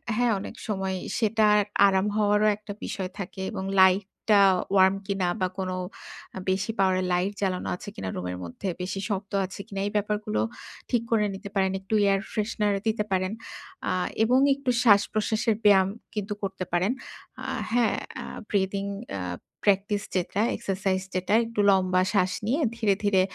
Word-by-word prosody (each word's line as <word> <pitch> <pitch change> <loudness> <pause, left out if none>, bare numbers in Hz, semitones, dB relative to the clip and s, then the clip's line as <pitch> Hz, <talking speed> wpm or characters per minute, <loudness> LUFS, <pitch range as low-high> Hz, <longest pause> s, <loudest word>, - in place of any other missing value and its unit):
হ্যাঁ, 240 0 +2
অনেক 195 - -7
সময় 190 -2 -1 0.2
সেটা 220 -1 +3 0.4
আরাম 190 +1 +2
হওয়ারও 210 0 +3
একটা 210 -1 -8
বিষয় 190 -2 -4
থাকে 190 0 -6
এবং 190 - -3 0.2
লাইটটা 200 +2 +4 0.3
warm 190 0 +6
কিনা 195 -3 0
বা 185 - +3
কোন 190 -1 -2 0.7
আ - - -3
বেশি 195 +4 0
power 190 -1 +4
এর 185 - -1
লাইট 180 +3 +1
জ্বালানো 185 -2 -1
আছে 180 - -9
কিনা 95 - -4
রুমের 90 0 -4
মধ্যে 85 - -6
বেশি 185 +1 -3
শক্ত 200 0 -3
আছে 185 - -9
কিনা 195 -2 -4
এই - - -3
ব্যাপারগুলো 205 - -1 0.5
ঠিক 240 - +3
করে 215 -2 +3
নিতে 200 +1 -8
পারেন। 190 -1 +2
একটু 195 +3 -6 0.2
air 195 - +2
freshener 210 -1 0
দিতে 215 -1 +1
পারেন 185 +1 +1 0.6
আ - - +1 0.3
এবং 250 +3 +4 0.2
একটু 275 -2 -4
শ্বাসপ্রশ্বাসের 215 0 +3
ব্যায়াম 195 -2 +6 0.3
কিন্তু 205 0 -2
করতে 190 -1 -3
পারেন। 185 +6 +2 0.5
আ - - -6 0.3
হ্যাঁ, 235 -3 +3 0.3
আ - - -8 0.2
breathing 200 0 0 0.2
অ্যা 95 -2 -3 0.4
practice 205 +1 +2
যেটা 185 +3 0
exercise 190 -1 -1
যেটা 185 +2 0
একটু 225 -1 -6
লম্বা 185 -1 +3
শ্বাস 185 -2 +3 0.2
নিয়ে 285 +7 +1 0.2
ধীরে, 210 -4 +3
ধীরে 200 -2 +4
195 Hz, 160 wpm, -26 LUFS, 190-210 Hz, 0.7 s, warm